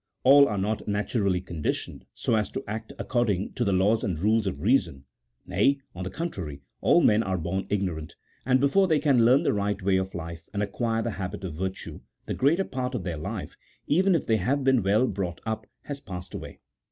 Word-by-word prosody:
All 140 +2 +8
are 105 - -2
not 105 +3 -2
naturally 100 -2 0
conditioned 85 -5 -4
so - - -1
as 105 -1 0
to - - -3
act 110 +1 -5
according 105 -6 0
to 125 - -1
the 100 - +1
laws 100 +4 +2
and 90 -5 -1
rules 105 +4 +2
of 80 -7 -3
reason; 85 - +1 0.4
nay, 100 +10 +2 0.2
on 90 - -6
the 90 - -3
contrary, 90 - -5 0.2
all - - +5
men 105 +1 +4
are 95 -4 -1
born 90 +3 -3
ignorant, 90 -6 -2 0.3
and 130 0 +3
before 185 +9 +3
they 160 -3 +3
can 135 -5 +4
learn 125 +4 +5
the - - +2
right 105 0 -1
way 95 -1 +2
of 95 0 -3
life 85 -1 -6
and 100 - +1
acquire 115 +2 -1
the 115 - -2
habit 95 +2 -5
of 90 -4 -4
virtue, 95 +4 -5 0.3
the - - -3
greater 165 +9 +2
part 130 -1 -3
of 110 - -3
their 85 -2 -3
life, 75 - -5 0.3
even 185 +4 +3
if 160 - 0
they 110 - +2
have 130 +8 0
been 130 -2 +4
well 105 +6 +3
brought 95 -6 -3
up, 110 -1 -3 0.2
has 145 -1 -6
passed 90 -5 -8
away. - - -8
105 Hz, 210 wpm, -27 LUFS, 95-125 Hz, 0.4 s, All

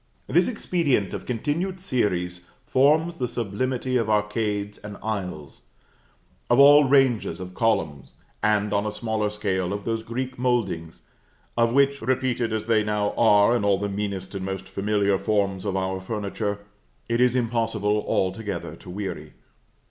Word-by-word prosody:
This 175 +7 +3
expedient 165 - 0
of - - -6
continued 160 - -2
series 90 - -1 0.2
forms 155 +6 +3
the 125 - -1
sublimity 125 +3 -2
of 115 -3 -1
arcades 105 -1 -1
and 105 -1 -9
aisles, 90 - -5 0.9
of 120 - +4
all 145 +1 +8
ranges 130 -10 +2
of 90 0 -7
columns, 80 - -1 0.3
and, 105 -1 +1
on 100 0 +2
a - - -2
smaller 110 -1 -1
scale, 95 -3 -2
of 100 0 -4
those 115 -1 -1
Greek 125 +3 -5
mouldings, 95 -10 -1 0.5
of 115 0 +3
which, 140 +2 +3
repeated 125 -1 0
as 110 -1 -2
they 110 -2 +3
now 105 -1 0
are 105 0 +4
in 120 - 0
all 100 -1 +3
the 100 +1 -2
meanest 100 -1 -4
and 95 -1 -4
most 95 0 -4
familiar 100 -1 0
forms 100 -3 0
of 95 -2 -1
our 95 0 -2
furniture, 100 0 -3 0.4
it 115 +1 +1
is 125 0 +4
impossible 110 -3 0
altogether 95 -3 -2
to - - -13
weary. 90 -5 -5
105 Hz, 150 wpm, -24 LUFS, 100-125 Hz, 0.9 s, all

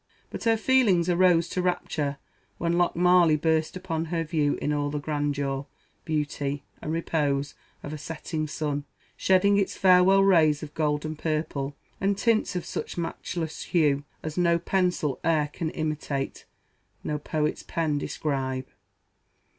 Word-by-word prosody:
But - - -6
her 225 -1 +4
feelings 210 -9 +3
arose 175 -1 +4
to 180 - -1
rapture 155 -5 -1 0.4
when 170 0 0
Lochmarlie 175 -1 +4
burst 160 +2 0
upon 165 -3 -3
her 165 0 -1
view 150 -2 0
in 150 - -1
all 145 0 0
the 150 - -3
grandeur, 145 -2 -2 0.4
beauty, 145 -3 -2 0.2
and 155 - -4
repose 145 -4 0 0.3
of 145 - -6
a 155 - -6
setting 155 0 -4
sun, 145 -1 -3 0.3
shedding 195 +2 +3
its 195 - -1
farewell 190 +1 +6
rays 160 -6 +4
of 150 - -8
gold 150 -1 0
and 155 0 -5
purple, 150 -3 -2 0.2
and 195 +1 +1
tints 225 -3 +1
of 180 - -2
such - - -5
matchless 165 -1 -4
hue, 145 -5 +2 0.2
as 155 +2 -3
no 170 -1 +4
pencil 175 -5 0
ere 155 -3 +2
can 165 -3 -2
imitate 150 -3 -3 0.6
no 150 0 -2
poet's 150 +1 -1
pen 155 -3 -1
describe. 135 -4 -2
155 Hz, 145 wpm, -26 LUFS, 145-175 Hz, 0.6 s, farewell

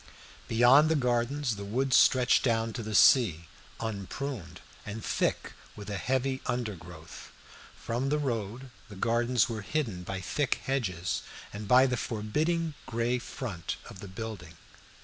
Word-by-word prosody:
Beyond 125 +7 +6
the 160 - +3
gardens 125 -1 0
the 100 - -6
woods 125 +6 +1
stretched 125 -1 +5
down 115 -2 +1
to 120 - -4
the 110 -1 -4
sea, 90 - +5 0.3
unpruned 105 -2 -5 0.2
and 105 +1 -6
thick - - -1 0.2
with 105 0 -8
a 100 - -2
heavy 130 +1 -1
undergrowth; 90 -10 -6 0.4
from 125 +4 -2
the 150 - +2
road 120 -2 -3 0.2
the 105 - -10
gardens 120 +3 +2
were 110 -2 -4
hidden 110 -5 -2
by 95 +1 -5
thick 130 - 0
hedges, 95 -10 -1 0.3
and 105 0 -6
by 125 +4 +7
the 125 -2 0
forbidding 155 +11 -1
gray 120 +2 0
front 100 - -5 0.2
of - - -12
the 100 - -8
building. 95 -4 -7
115 Hz, 145 wpm, -29 LUFS, 100-130 Hz, 0.4 s, by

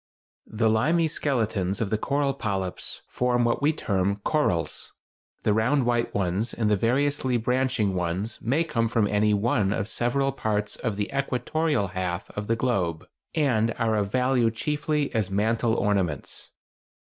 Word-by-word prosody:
The 110 +1 0
limy 155 +10 +3
skeletons 110 - -1
of 110 -4 -2
the 110 - +2
coral 140 +1 0
polyps 95 -8 -4
form 125 -1 +1
what 120 - +1
we 145 +2 +4
term 100 -9 0
"corals." 90 - 0 0.5
The 105 - +3
round 125 +5 +2
white 120 -1 +1
ones 100 +4 -1
and 110 -2 +1
the - - +5
variously 130 +3 +1
branching 125 -3 +1
ones 90 +5 -2
may 140 +8 +1
come 115 -8 0
from 115 -1 +2
any 105 +1 +2
one 100 -1 +1
of 100 -1 -1
several 130 +4 0
parts 105 -5 -1
of 115 -5 -3
the 105 -1 -2
equatorial 140 -2 0
half 90 -1 -3
of 105 0 -5
the 115 - +2
globe, 95 -10 -1 0.3
and 115 -7 +2
are 115 -2 +1
of 100 -2 -1
value 125 -1 +2
chiefly 150 +4 -1
as 110 -5 0
mantel 110 +3 +1
ornaments. 95 - -1
115 Hz, 155 wpm, -26 LUFS, 100-130 Hz, 0.5 s, the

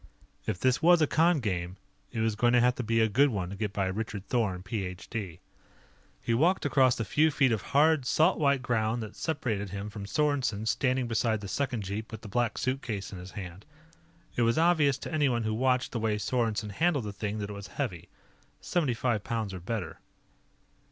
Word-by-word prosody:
If 90 - -2
this 130 +4 +2
was 175 +1 +6
a - - +6
con 160 0 +3
game, 90 -4 -3 0.3
it 110 - -2
was 110 -1 +1
going 120 +3 +2
to 125 - +6
have 125 +1 +4
to 125 - -2
be 115 0 +1
a 110 - +4
good 135 +7 +4
one 95 -6 -3
to - - -5
get 105 0 -2
by 100 -1 -1
Richard 100 +1 -4
Thorn, 95 -7 0
Ph.D. 95 -1 -5 0.8
He 115 - -1
walked 165 +9 +2
across 130 -3 +4
the 115 - -3
few 150 +11 +3
feet 135 -4 +2
of 110 - 0
hard, 145 -1 +3
salt 160 +8 +3
white 140 -3 +2
ground 115 -1 0
that 105 - -9
separated 115 -11 -2
him 100 +2 -5
from 100 -1 -7
Sorensen 135 -6 0
standing 130 0 +1
beside 115 -1 +1
the 100 - -6
second 125 -1 -2
jeep 100 +4 -5
with 110 -1 -7
the 110 - -9
Black 120 +3 0
Suitcase 125 -7 -3
in 95 - -7
his 90 +1 -10
hand. 95 0 -7 0.7
It - - 0
was 115 +2 +3
obvious 160 -5 +4
to 150 - -7
anyone 135 -7 +2
who 110 0 -1
watched 125 +2 +1
the 120 - -2
way 110 -1 0
Sorensen 110 -1 -1
handled 150 - +1
the 105 - -5
thing 105 +1 -3
that 105 -1 -4
it - - -5
was 100 -1 -8
heavy 85 -2 -4 0.5
seventy 150 -9 0
five 115 -3 0
pounds 110 -4 -3
or 95 - -5
better. 95 0 -4
115 Hz, 205 wpm, -29 LUFS, 100-130 Hz, 0.8 s, was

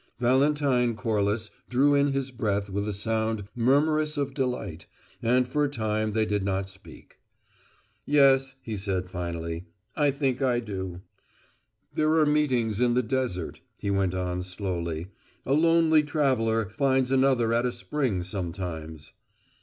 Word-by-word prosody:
Valentine 130 -1 +2
Corliss 110 -2 -1 0.2
drew 140 +4 +4
in 140 0 +3
his 135 -1 -2
breath 100 -5 -1
with 100 +2 -2
a - - -1
sound 110 0 -1
murmurous 150 +5 +2
of 140 -1 -1
delight, 125 - -3 0.3
and 125 +2 +2
for 150 +3 0
a 145 - +1
time 110 -4 -1
they 110 +1 +1
did 105 -1 0
not 95 0 -1
speak. 95 0 -14 0.8
"Yes," 135 -2 +4
he 110 -2 -4
said, 95 -2 -3
finally, 85 -1 -4 0.3
"I 145 -2 +3
think 135 -2 -1
I 125 -3 +2
do." 95 -5 -5 0.9
"There 155 +1 +2
are 155 -1 +4
meetings 125 -8 +1
in 120 -1 +3
the 125 - +2
desert," 120 -8 -2 0.2
he 100 - -2
went 95 -2 +1
on, 90 -1 -2
slowly. 90 -3 -4 0.4
"A 135 - +1
lonely 165 0 +4
traveller 125 - +1
finds 135 -2 +2
another 130 -4 +3
at 120 +2 +2
a - - -1
spring, 125 -10 -2
sometimes." 85 -4 -6
115 Hz, 145 wpm, -27 LUFS, 95-135 Hz, 0.9 s, drew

